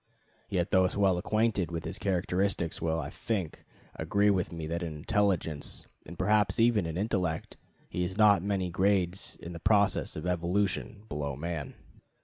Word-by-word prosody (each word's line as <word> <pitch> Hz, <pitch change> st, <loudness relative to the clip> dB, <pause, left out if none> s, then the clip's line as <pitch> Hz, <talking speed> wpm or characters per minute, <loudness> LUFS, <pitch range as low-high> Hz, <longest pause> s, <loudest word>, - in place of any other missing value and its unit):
Yet 90 Hz, -2 st, 0 dB
those 95 Hz, -1 st, +3 dB
well 95 Hz, -3 st, +3 dB
acquainted 110 Hz, -2 st, +1 dB
with 85 Hz, -1 st, -4 dB
his -, -, -4 dB
characteristics 95 Hz, -2 st, 0 dB
will, 80 Hz, 0 st, 0 dB
I -, -, -5 dB
think, 95 Hz, -9 st, -3 dB, 0.3 s
agree 100 Hz, 0 st, +2 dB
with 95 Hz, -3 st, 0 dB
me 85 Hz, -2 st, -5 dB
that 85 Hz, +2 st, -3 dB
in 80 Hz, -3 st, -4 dB
intelligence 90 Hz, -3 st, -1 dB, 0.2 s
and 85 Hz, +2 st, -9 dB
perhaps 105 Hz, +1 st, +2 dB
even 115 Hz, -6 st, +4 dB
in 80 Hz, +1 st, -4 dB
intellect 90 Hz, -6 st, -1 dB, 0.3 s
he 90 Hz, -, -2 dB
is 95 Hz, +2 st, -3 dB
not 105 Hz, -4 st, +6 dB
many 95 Hz, -2 st, -1 dB
grades 95 Hz, 0 st, +1 dB
in 85 Hz, -, -8 dB
the 85 Hz, -, -7 dB
process 100 Hz, +2 st, +2 dB
of 80 Hz, -, -5 dB
evolution 90 Hz, +4 st, -1 dB
below 70 Hz, -5 st, -3 dB
man. 80 Hz, -1 st, -4 dB
90 Hz, 160 wpm, -30 LUFS, 85-100 Hz, 0.3 s, not